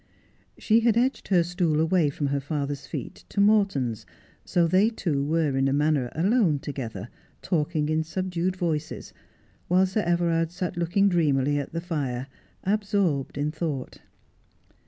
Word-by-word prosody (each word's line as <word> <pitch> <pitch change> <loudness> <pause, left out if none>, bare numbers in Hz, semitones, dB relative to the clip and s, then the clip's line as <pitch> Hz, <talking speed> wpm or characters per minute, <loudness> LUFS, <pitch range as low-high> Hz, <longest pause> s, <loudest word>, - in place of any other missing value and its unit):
She 220 +1 +3
had 230 -1 +2
edged 255 +3 0
her 180 -4 +4
stool 170 -3 0
away 160 -1 +3
from 145 +1 -3
her 140 - +1
father's 140 -1 -4
feet - - -7
to - - -4
Morton's, 195 - +2 0.4
so 175 -1 +2
they 190 +6 +4
two 160 -11 -1
were 155 -1 +1
in 135 0 +2
a 135 - +1
manner 145 -3 +1
alone 185 -2 +2
together, 120 -8 -6 0.4
talking 155 -3 0
in 155 +1 +1
subdued 185 +1 -2
voices, 160 -4 -3 0.5
while 185 +2 +4
Sir 190 +3 -1
Everard 170 -2 +1
sat 180 0 -4
looking 175 +4 +2
dreamily 145 -5 +2
at 140 - -5
the 165 - -3
fire, 140 -8 -3 0.4
absorbed 195 -9 0
in 145 +1 -1
thought. 150 -5 -4
165 Hz, 150 wpm, -26 LUFS, 145-185 Hz, 0.5 s, her